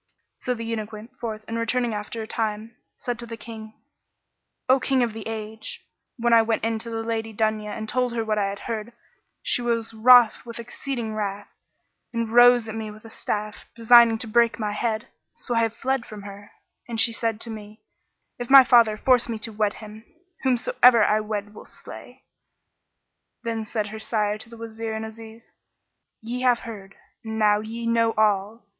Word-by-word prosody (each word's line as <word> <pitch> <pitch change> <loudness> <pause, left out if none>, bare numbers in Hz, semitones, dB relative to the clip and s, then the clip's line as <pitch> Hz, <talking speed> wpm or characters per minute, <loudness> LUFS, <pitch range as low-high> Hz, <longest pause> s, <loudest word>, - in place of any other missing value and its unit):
So 250 - -2
the 230 -1 -6
eunuch 220 -2 -4
went 220 +5 -10
forth 220 -2 -5
and 230 0 -3
returning 235 0 0
after 210 +2 -5
a - - -8
time, 220 0 -3 0.2
said 245 -1 -4
to 235 - -6
the 230 0 -7
King, 220 -1 -10 0.9
"O 260 +1 +5
King 260 -1 +1
of 230 -2 -2
the 220 -1 -7
Age, 220 0 -6 0.3
when 235 0 +2
I 230 - +8
went 225 0 -1
in 225 0 0
to 230 - -8
the 225 0 -3
Lady 225 0 -3
Dunya 215 0 -1
and 220 - -5
told 250 +1 0
her 225 -1 -1
what 215 -1 0
I 200 -1 0
had 200 0 -7
heard, 230 0 -5 0.5
she - - 0
was 230 -1 -1
wroth 240 0 +6
with 235 -1 -8
exceeding 235 -1 -5
wrath 205 -1 -4 0.6
and 230 -2 -2
rose 245 -1 +7
at 220 - -5
me 220 -1 -5
with 215 +1 -13
a 225 - -11
staff 210 -1 -4
designing 230 0 +6
to 225 - -3
break 235 +1 +3
my 210 -2 -2
head; 220 +1 -2 0.3
so 245 - -4
I 230 -1 +2
fled 260 +2 -2
from 210 -2 -9
her, 205 0 -10 0.4
and 230 -1 -3
she 230 - +5
said 225 -1 -2
to 230 - -3
me 215 0 -10 0.6
'If 245 - -5
my 270 -1 +10
Father 235 -4 +5
force 250 0 +3
me 225 - -2
to 220 +1 -5
wed 210 -1 0
him, 215 0 -11 0.4
whomsoever 245 -2 +4
I 215 +1 +3
wed 210 -1 -4
I - - -19
will 210 - -12
slay.' - - -12 1.2
Then 225 -1 -3
said 210 -1 -3
her 220 +1 -7
sire 215 -1 -1
to 220 - -13
the 230 - -12
Wazir 225 0 -6
and 220 0 -4
Aziz, 225 +1 -12 0.7
"Ye 245 +3 -4
have 250 -2 +3
heard, 200 -4 -9 0.3
and 220 -1 -5
now 210 -1 +4
ye 225 +2 -6
know 230 -1 +2
all! 210 0 +1
225 Hz, 195 wpm, -24 LUFS, 215-235 Hz, 1.2 s, my